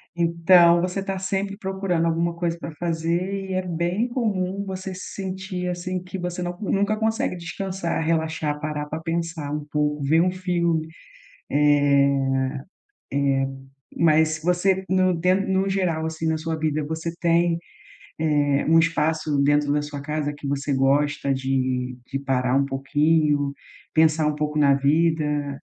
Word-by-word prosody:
Então 170 Hz, 0 st, +5 dB
você 180 Hz, +2 st, -2 dB
está 195 Hz, 0 st, -3 dB
sempre 195 Hz, +1 st, -2 dB
procurando 190 Hz, -4 st, -1 dB
alguma 170 Hz, +1 st, 0 dB
coisa 170 Hz, 0 st, -2 dB
para 165 Hz, -, -6 dB
fazer 175 Hz, +4 st, -2 dB
e 190 Hz, -, -2 dB
é 185 Hz, -, +1 dB
bem 175 Hz, +5 st, -1 dB
comum 200 Hz, -5 st, -1 dB
você 190 Hz, 0 st, -5 dB
se 185 Hz, -, -8 dB
sentir, 190 Hz, -1 st, -4 dB
assim, 180 Hz, +1 st, -3 dB
que 180 Hz, +1 st, -6 dB
você 180 Hz, 0 st, -4 dB
não 175 Hz, 0 st, -4 dB
nunca 205 Hz, +1 st, +1 dB
consegue 220 Hz, 0 st, 0 dB
descansar, 170 Hz, -1 st, -3 dB
relaxar, 160 Hz, -2 st, -1 dB
parar 150 Hz, -1 st, -3 dB
para 155 Hz, +2 st, -5 dB
pensar 165 Hz, -2 st, -3 dB
um 150 Hz, 0 st, -3 dB
pouco, 150 Hz, 0 st, 0 dB
ver 160 Hz, +4 st, +3 dB
um 180 Hz, +1 st, +2 dB
filme, 170 Hz, -3 st, 0 dB, 0.6 s
eh 150 Hz, 0 st, +4 dB
eh, -, -, +6 dB, 2.2 s
mas 160 Hz, 0 st, +3 dB
você 185 Hz, +2 st, +2 dB
no 185 Hz, -1 st, +3 dB
den 185 Hz, +4 st, +1 dB
no 190 Hz, +1 st, +1 dB
geral, 175 Hz, -5 st, 0 dB
assim, 160 Hz, 0 st, -4 dB
na 160 Hz, -, +1 dB
sua 160 Hz, 0 st, -3 dB
vida, 155 Hz, -1 st, -1 dB
você 160 Hz, +2 st, -4 dB
tem, 170 Hz, 0 st, +2 dB, 0.6 s
eh, 145 Hz, -3 st, +2 dB
um 165 Hz, +1 st, +6 dB
espaço 160 Hz, -2 st, +1 dB
dentro 145 Hz, 0 st, +2 dB
da 145 Hz, 0 st, +1 dB
sua 145 Hz, -1 st, -6 dB
casa 150 Hz, 0 st, -2 dB
que 145 Hz, -, -8 dB
você 140 Hz, +1 st, -1 dB
gosta 140 Hz, +1 st, +2 dB
de 130 Hz, -1 st, -1 dB
de 135 Hz, -, -1 dB
parar 130 Hz, -2 st, 0 dB
um 140 Hz, -, +3 dB
pouquinho, 145 Hz, +1 st, +1 dB, 0.4 s
pensar 155 Hz, -1 st, +4 dB
um 150 Hz, -, +1 dB
pouco 150 Hz, 0 st, -2 dB
na 140 Hz, -2 st, +5 dB
vida? 150 Hz, -1 st, +1 dB
165 Hz, 155 wpm, -23 LUFS, 150-180 Hz, 2.2 s, eh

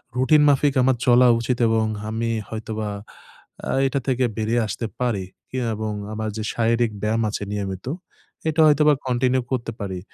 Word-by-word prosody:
Routine 130 Hz, +4 st, +4 dB
মাফিক 140 Hz, 0 st, +3 dB
আমার 130 Hz, 0 st, +3 dB
চলা 125 Hz, 0 st, +6 dB
উচিত 120 Hz, +1 st, -1 dB
এবং 110 Hz, 0 st, +2 dB, 0.2 s
আমি 115 Hz, +2 st, -2 dB, 0.2 s
হয়তোবা 110 Hz, -1 st, -4 dB, 0.8 s
আ -, -, 0 dB, 0.2 s
এটা 140 Hz, +1 st, -1 dB
থেকে 130 Hz, -1 st, +1 dB
বেরিয়ে 115 Hz, +2 st, +1 dB
আসতে 115 Hz, -, -4 dB
পারি 115 Hz, -7 st, -1 dB, 0.2 s
কি 130 Hz, -, -5 dB, 0.2 s
এবং 110 Hz, 0 st, -3 dB, 0.2 s
আমার 110 Hz, 0 st, -3 dB
যে 110 Hz, -, -3 dB
শারীরিক 115 Hz, 0 st, +1 dB
ব্যায়াম 110 Hz, +2 st, 0 dB
আছে 105 Hz, -, -4 dB
নিয়মিত, 95 Hz, -1 st, -4 dB, 0.6 s
এটা 160 Hz, +1 st, +2 dB
হয়তোবা 150 Hz, 0 st, +5 dB
কন্টিনিউ 125 Hz, +1 st, +1 dB
করতে 120 Hz, -3 st, -2 dB
পারি। 95 Hz, -3 st, -4 dB
115 Hz, 160 wpm, -23 LUFS, 110-130 Hz, 0.8 s, চলা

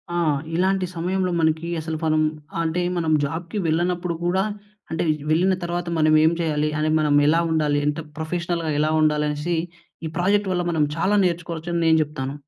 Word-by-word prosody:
ఆ! -, -, 0 dB, 0.4 s
ఇలాంటి 185 Hz, +1 st, +1 dB
సమయంలో 180 Hz, +2 st, -1 dB
మనకి 160 Hz, +1 st, +1 dB
అసలు 160 Hz, 0 st, -4 dB
మనం 155 Hz, -1 st, +2 dB, 0.4 s
అంటే 165 Hz, +2 st, -1 dB, 0.2 s
మనం 165 Hz, -2 st, 0 dB
జాబ్‌కి 165 Hz, +7 st, -5 dB
వెళ్ళనప్పుడు 175 Hz, +1 st, 0 dB
కూడా 185 Hz, +2 st, +2 dB, 0.5 s
అంటే, 165 Hz, -, -1 dB, 0.3 s
వెళ్ళిన 180 Hz, +5 st, +3 dB
తర్వాత 175 Hz, 0 st, -3 dB
మనం 155 Hz, 0 st, +3 dB
ఏం 160 Hz, +1 st, +5 dB
చేయాలి? 155 Hz, -2 st, 0 dB
అంటే 155 Hz, 0 st, +1 dB
మనం 150 Hz, -1 st, +2 dB
ఎలా 165 Hz, +3 st, +4 dB
ఉండాలి? 150 Hz, -2 st, +1 dB
ఎంత 150 Hz, +2 st, -1 dB, 0.2 s
ప్రొఫెషనల్‌గా 170 Hz, 0 st, -2 dB
ఎలా 155 Hz, +1 st, +2 dB
ఉండాలి 150 Hz, -1 st, +2 dB
అనేసి, 150 Hz, +4 st, -2 dB, 0.5 s
ఈ -, -, -1 dB
ప్రాజెక్ట్ 200 Hz, +3 st, +2 dB
వల్ల 180 Hz, -1 st, 0 dB
మనం 160 Hz, -2 st, +2 dB
చాలా 190 Hz, +5 st, +1 dB
నేర్చుకోవచ్చు 170 Hz, -1 st, -3 dB
అని 170 Hz, -, 0 dB
నేను 160 Hz, 0 st, +5 dB
చెప్తాను. 140 Hz, -3 st, -5 dB
165 Hz, 170 wpm, -23 LUFS, 155-175 Hz, 0.5 s, ఏం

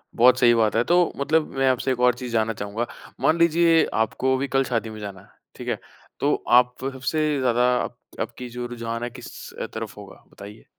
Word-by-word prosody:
बहुत 125 Hz, +2 st, +5 dB
सही 120 Hz, -1 st, +6 dB
बात 110 Hz, -2 st, +2 dB
है, 115 Hz, -, +3 dB
तो 175 Hz, +4 st, +3 dB
मतलब 150 Hz, +3 st, +1 dB
मैं 135 Hz, 0 st, +2 dB
आपसे 130 Hz, +1 st, 0 dB
एक 125 Hz, -, -2 dB
और 125 Hz, 0 st, +5 dB
चीज़ 125 Hz, -1 st, -7 dB
जानना 115 Hz, 0 st, +1 dB
चाहूँगा, 105 Hz, +3 st, -4 dB, 0.3 s
मान 160 Hz, -, +3 dB
लीजिए, 170 Hz, 0 st, +4 dB
आपको 130 Hz, +4 st, +1 dB
अभी 135 Hz, +2 st, -1 dB
कल 135 Hz, 0 st, +2 dB
शादी 115 Hz, -3 st, -2 dB
में 110 Hz, 0 st, -9 dB
जाना 100 Hz, -3 st, -7 dB
है। -, -, -20 dB, 0.3 s
ठीक -, -, -9 dB
है? -, -, -1 dB, 0.4 s
तो 145 Hz, +1 st, +2 dB, 0.2 s
आप 125 Hz, 0 st, +3 dB, 0.2 s
सबसे 135 Hz, +4 st, -1 dB
ज़्यादा 125 Hz, -2 st, +2 dB, 0.2 s
आप -, -, -7 dB, 0.2 s
आपकी 125 Hz, -1 st, -5 dB
जो 120 Hz, +1 st, -5 dB
रुझान 115 Hz, -1 st, -5 dB
है 120 Hz, -, -2 dB
किस 120 Hz, -, -11 dB, 0.4 s
तरफ -, -, -6 dB
होगा? -, -, -12 dB
बताइए। 105 Hz, +2 st, -12 dB
125 Hz, 205 wpm, -24 LUFS, 115-135 Hz, 0.4 s, सही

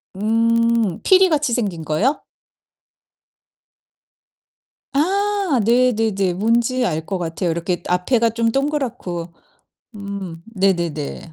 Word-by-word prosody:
음, 230 Hz, -1 st, +1 dB
피리같이 325 Hz, -9 st, +4 dB
생긴 200 Hz, -9 st, -2 dB
거요? 200 Hz, -, 0 dB, 2.7 s
아 390 Hz, 0 st, +1 dB
네네네. 225 Hz, -6 st, +2 dB
뭔지 235 Hz, +6 st, +1 dB
알 160 Hz, -5 st, -2 dB
것 195 Hz, -, -3 dB
같아요. 170 Hz, 0 st, -2 dB
이렇게 170 Hz, +1 st, -2 dB
앞에가 225 Hz, +7 st, +2 dB
좀 230 Hz, 0 st, 0 dB
동그랗고 245 Hz, -, -3 dB, 0.6 s
음, 200 Hz, -5 st, -7 dB
네네네. 170 Hz, -5 st, -1 dB
220 Hz, 185 characters per minute, -20 LUFS, 180-250 Hz, 2.7 s, 피리같이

